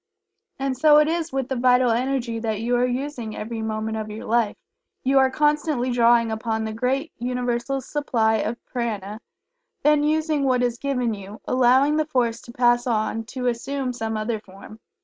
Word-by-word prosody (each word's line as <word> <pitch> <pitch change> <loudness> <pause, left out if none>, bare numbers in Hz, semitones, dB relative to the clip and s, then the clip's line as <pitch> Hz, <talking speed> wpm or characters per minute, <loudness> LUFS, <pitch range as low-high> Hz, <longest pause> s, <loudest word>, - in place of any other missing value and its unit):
And 270 -1 -1
so 300 +3 +6
it 300 0 +5
is 330 0 -1
with 270 -2 -2
the 265 - -2
Vital 250 0 +4
Energy 240 -1 -1
that 220 -2 -2
you 240 +2 0
are 245 +1 +2
using 250 -3 -4
every 225 +1 -5
moment 220 0 -3
of 215 -1 -4
your 215 +3 -7
life. 230 -2 +1 0.5
You 270 +1 +4
are 265 0 +4
constantly 295 -2 +1
drawing 235 -1 +4
upon 220 0 -2
the 220 0 -4
great 265 +7 -1
Universal 250 +2 -2
supply 230 -6 0
of 230 +2 -2
Prana, 215 -3 -4 0.6
then 300 0 +4
using 310 -1 +1
what 250 -2 +2
is 240 -1 -1
given 250 -5 -1
you, 200 +1 -9
allowing 260 +4 +3
the 310 -1 0
force 240 -5 0
to 235 - -12
pass 240 0 +2
on 225 -1 -1
to 250 +2 -6
assume 250 +2 -2
some 225 -2 -3
other 215 +1 -2
form. 205 +2 -14
245 Hz, 180 wpm, -23 LUFS, 225-270 Hz, 0.6 s, so